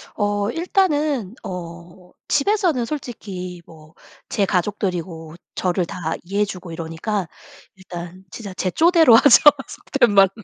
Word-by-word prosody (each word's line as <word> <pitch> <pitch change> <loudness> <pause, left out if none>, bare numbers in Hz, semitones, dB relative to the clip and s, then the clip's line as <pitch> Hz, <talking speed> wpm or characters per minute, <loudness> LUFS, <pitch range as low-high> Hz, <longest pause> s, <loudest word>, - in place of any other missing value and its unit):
어 205 -1 0
일단은 300 - 0
어 175 0 -9 0.2
집에서는 340 - +1
솔직히 195 - -6
뭐 155 -1 -17 0.4
제 200 - +1
가족들이고 180 -4 -3 0.2
저를 180 -1 0
다 165 -1 -4
이해해 200 +4 0
주고 180 -3 -8
이러니까 165 +4 -3 0.5
일단 180 -1 -9
진짜 200 -3 -8
제 185 0 -2
쪼대로 325 - +6
하죠 250 +3 +7 0.3
속된 245 -6 0
말로. 195 -1 +6
195 Hz, 260 characters per minute, -21 LUFS, 175-240 Hz, 0.5 s, 하죠